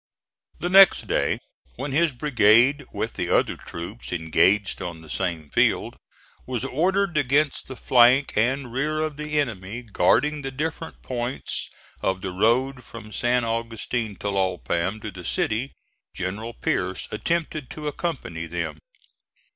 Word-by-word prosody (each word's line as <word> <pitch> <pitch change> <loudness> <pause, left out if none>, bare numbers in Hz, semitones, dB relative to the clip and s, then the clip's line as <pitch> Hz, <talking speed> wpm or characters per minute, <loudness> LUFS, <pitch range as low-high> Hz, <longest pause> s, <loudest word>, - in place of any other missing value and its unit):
The 175 - -2
next 195 +1 +7
day, - - +1 0.4
when 135 +3 -4
his 160 +3 +3
brigade, 130 +1 +4
with - - -3
the - - -3
other - - +2
troops 90 +8 -8
engaged 90 +4 +2
on 85 -3 -5
the 80 - -11
same 85 -5 -3
field, - - +2 0.5
was 125 -1 -2
ordered 180 +5 +1
against 145 +1 +1
the 130 - -7
flank 125 +3 +4
and 125 +3 0
rear 150 +4 0
of 155 -1 -2
the 150 0 -1
enemy 115 -3 -3
guarding 140 +8 +2
the 135 - -4
different 160 +4 -5
points 125 0 -3 0.3
of 95 0 0
the 95 -1 -3
road 125 +7 +1
from 110 -2 -11
San 120 +4 +1
Augustin 115 -1 -2
Tlalpam 95 0 -1
to 110 - -4
the 90 -1 -10
city, 110 +9 -1 0.4
General 105 +6 -4
Pierce 90 0 -1
attempted 155 +3 -2
to 150 -1 -6
accompany 130 - -4
them. 85 -2 -4
120 Hz, 140 wpm, -24 LUFS, 95-145 Hz, 0.5 s, next